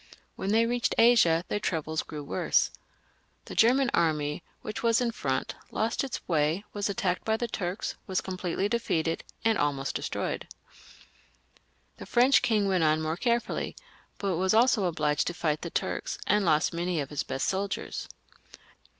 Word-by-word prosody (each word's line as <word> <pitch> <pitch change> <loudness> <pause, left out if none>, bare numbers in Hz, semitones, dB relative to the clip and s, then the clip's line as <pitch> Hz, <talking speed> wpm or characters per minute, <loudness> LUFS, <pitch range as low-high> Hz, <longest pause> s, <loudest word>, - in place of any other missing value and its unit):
When 190 - -3
they 225 +2 +4
reached 240 0 0
Asia, 200 -8 +5
their 205 - -1
troubles 160 -5 -1
grew 150 -2 -7
worse. 115 -9 +1 0.7
The - - -8
German 250 +3 +4
army, 150 -2 +1 0.2
which 215 - -5
was 230 -1 +3
in 245 -2 0
front, 130 -11 -2 0.2
lost 225 +4 -1
its 270 - -5
way, 160 +4 +1
was 205 0 -1
attacked 185 -2 -1
by 220 0 +1
the 240 - -2
Turks, 185 -2 -3
was 190 -2 0
completely 185 +1 -2
defeated, 170 -8 -1 0.2
and 225 -1 +3
almost 140 -2 0
destroyed. - - -3 1.5
The - - -9
French 255 +3 +5
king 210 -4 +2
went 185 -3 +2
on 155 0 +3
more 160 0 -1
carefully, 235 +5 -1 0.4
but 195 -4 -1
was 190 +3 +2
also 230 -3 +4
obliged 150 -4 0
to 175 - -2
fight 155 -3 -1
the 170 - -4
Turks, - - -2
and 210 +1 +3
lost 155 -1 +3
many 170 0 -1
of 140 -1 -4
his 145 - -1
best 135 - -2
soldiers. 195 +1 -3
185 Hz, 160 wpm, -28 LUFS, 160-225 Hz, 1.5 s, Asia